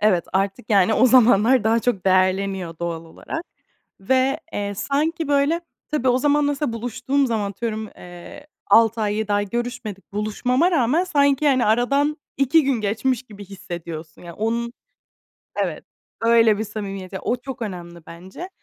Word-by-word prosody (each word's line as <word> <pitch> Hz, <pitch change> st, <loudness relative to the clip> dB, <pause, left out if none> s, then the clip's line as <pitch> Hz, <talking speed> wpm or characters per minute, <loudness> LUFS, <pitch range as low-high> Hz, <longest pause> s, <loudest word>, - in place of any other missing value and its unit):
Evet, 190 Hz, -5 st, +3 dB
artık, 195 Hz, +2 st, -1 dB
yani, 200 Hz, +1 st, +4 dB
o 255 Hz, -, +5 dB
zamanlar 245 Hz, -1 st, +5 dB
daha 225 Hz, +1 st, +3 dB
çok 215 Hz, -7 st, -1 dB
değerleniyor 185 Hz, -2 st, +1 dB
doğal 170 Hz, -1 st, -4 dB
olarak. 240 Hz, -, -7 dB, 0.6 s
Ve, 260 Hz, +8 st, +1 dB
eee, 205 Hz, 0 st, -3 dB
sanki 300 Hz, -, -1 dB
böyle 285 Hz, +4 st, +2 dB, 0.3 s
Tabii, 265 Hz, -4 st, +1 dB
o 250 Hz, 0 st, +3 dB
zaman 290 Hz, +2 st, +2 dB
mesela 285 Hz, -2 st, -1 dB
buluştuğum 245 Hz, +4 st, -1 dB
zaman 215 Hz, -4 st, -1 dB
atıyorum, 220 Hz, +1 st, -4 dB
eee, 175 Hz, +11 st, -12 dB, 0.2 s
6 225 Hz, 0 st, +4 dB
ay 210 Hz, -1 st, 0 dB
7 215 Hz, -1 st, -2 dB
ay 205 Hz, 0 st, 0 dB
görüşmedik. 240 Hz, -5 st, -5 dB
Buluşmama 250 Hz, -, +1 dB
rağmen 310 Hz, +2 st, +2 dB
sanki, 285 Hz, -4 st, +2 dB
hani, 260 Hz, -3 st, +3 dB
aradan 275 Hz, +7 st, +2 dB, 0.2 s
2 280 Hz, +3 st, +3 dB
gün 265 Hz, -4 st, 0 dB
geçmiş 225 Hz, +4 st, -1 dB
gibi 205 Hz, -4 st, -12 dB
hissediyorsun. 175 Hz, -5 st, -8 dB
Yani 175 Hz, -, -9 dB
onun 235 Hz, +3 st, -2 dB, 0.8 s
Evet, -, -, -2 dB, 0.4 s
öyle 230 Hz, -2 st, +4 dB
bir 220 Hz, -, -1 dB
samimiyet. 195 Hz, -3 st, -6 dB
Ya, 190 Hz, -, -5 dB
o 245 Hz, -, 0 dB
çok 250 Hz, 0 st, -8 dB
önemli 175 Hz, -5 st, -7 dB
bence. 185 Hz, -, -9 dB
225 Hz, 155 wpm, -22 LUFS, 195-265 Hz, 0.8 s, o